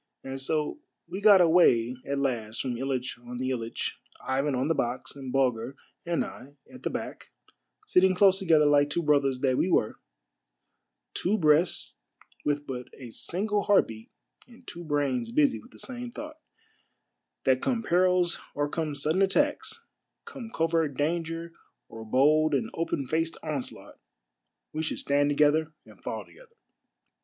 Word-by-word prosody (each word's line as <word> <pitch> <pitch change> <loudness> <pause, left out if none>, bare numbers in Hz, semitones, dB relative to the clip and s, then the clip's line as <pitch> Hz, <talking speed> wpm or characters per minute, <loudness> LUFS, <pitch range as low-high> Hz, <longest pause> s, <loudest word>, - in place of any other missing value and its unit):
And 135 0 -6
so 150 - -1 0.3
we 195 - -6
got 205 -3 +8
away 130 -9 +4
at 140 0 -1
last 120 -5 -2
from 125 -2 -2
Hitch 130 -1 -3
on 120 0 -8
the 130 +1 -1
Ilitch, 115 -2 -3 0.3
Ivan 135 +1 0
on 130 +3 0
the 165 - +2
box, 125 -3 -3
and 135 -2 -7
Bulger 130 -1 0 0.3
and 170 -1 0
I 140 +2 -11 0.2
at 255 - -11
the - - -2
back, - - -6 0.6
sitting 185 - +4
close 190 0 +5
together 160 -6 +4
like 145 0 +4
two 170 +3 -1
brothers 140 -4 +2
that 130 -2 +2
we 185 - +2
were 110 - +1 0.6
— - - -54
two 205 +4 0
breasts 155 - +2 0.4
with 145 0 -1
but 125 -3 -6
a 125 -3 -10
single 205 - -1
heart 205 -1 +5
beat 110 0 -10 0.4
and 245 +1 -18
two 175 0 -8
brains 155 - -1
busy 285 +1 +3
with 240 - -16
the - - -17
same 245 -2 -6
thought 305 +5 -9 0.5
— - - -55
that 130 -1 +3
come 240 -3 0
perils 180 -1 +2 0.2
or 145 0 0
come 155 -1 -3
sudden 155 +6 +1
attacks, 290 +10 +1 0.4
come 235 -3 -8
covert 165 - 0
danger 165 +2 -2 0.4
or 110 - -9
bold 150 +6 +3
and 130 - -1
open 165 -4 -2
faced 165 +4 -1
onslaught, 150 -5 -5 0.7
we 155 - -2
should 160 - -2
stand 145 +1 +2
together 150 +2 +2
and - - -17
fall - - -5
together 470 -2 -19
150 Hz, 160 wpm, -28 LUFS, 135-180 Hz, 0.7 s, got